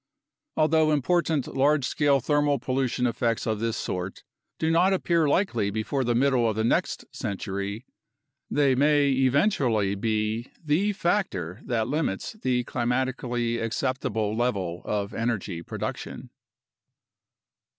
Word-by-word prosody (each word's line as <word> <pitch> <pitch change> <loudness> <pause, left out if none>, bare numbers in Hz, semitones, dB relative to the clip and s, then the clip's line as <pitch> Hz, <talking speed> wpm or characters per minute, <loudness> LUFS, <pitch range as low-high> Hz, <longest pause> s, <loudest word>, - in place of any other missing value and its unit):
Although 155 0 +4
important 155 0 +1
large 140 0 +2
scale 140 +2 +2
thermal 145 +1 +2
pollution 130 0 -1
effects 115 0 0
of 110 -3 -1
this 115 0 -1
sort 90 +1 -4 0.3
do 160 0 0
not 180 +4 +4
appear 170 -4 +2
likely 120 - +1
before 110 +6 -1
the 120 -1 +1
middle 125 -2 +3
of 110 - -2
the 110 - 0
next 115 - 0
century, 100 +3 -4 0.6
they 140 -2 +3
may 145 +1 +3
eventually 130 - +2
be 110 +3 -1
the 165 +7 +1
factor 150 - -1
that 115 -3 0
limits 145 -8 -2
the 130 - 0
climatically 120 -1 -1
acceptable 115 -2 -1
level 100 -8 -1
of 100 -1 -2
energy 110 -7 -2
production. - - -6
125 Hz, 120 wpm, -26 LUFS, 110-145 Hz, 0.6 s, Although